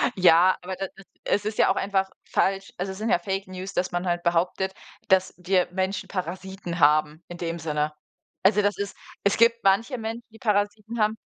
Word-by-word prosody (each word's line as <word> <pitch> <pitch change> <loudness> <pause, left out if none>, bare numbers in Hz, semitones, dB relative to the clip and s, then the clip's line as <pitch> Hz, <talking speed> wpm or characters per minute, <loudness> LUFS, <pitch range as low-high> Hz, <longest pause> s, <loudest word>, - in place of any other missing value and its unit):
Ja, 180 0 +6
aber 185 +1 -5
da 195 +1 -3
da 195 - -14 0.2
es 205 0 +1
ist 215 0 -3
ja - - +5
auch - - 0
einfach 195 -1 0
falsch. 195 0 0
Also 190 +2 -3
es 190 - -8
sind 220 +2 -2
ja - - +4
Fake 195 +2 -3
News, 185 +1 -7
dass 180 - -1
man 175 +1 -2
halt 175 0 0
behauptet, 180 +3 +1 0.3
dass 185 -1 +3
dir 180 0 +2
Menschen 190 +2 -2
Parasiten 185 -1 -5
haben 150 +2 +3
in 175 - -8
dem 170 0 -3
Sinne. 150 -1 -1 0.5
Also, 210 +2 +5
das 205 0 +1
ist 200 0 -4 0.3
es 200 - +2
gibt 230 0 +4
manche 225 +7 +2
Menschen, 225 +1 -5
die 225 - -16
Parasiten 210 0 -1
haben, 215 +1 +2
190 Hz, 200 wpm, -25 LUFS, 175-205 Hz, 0.5 s, Ja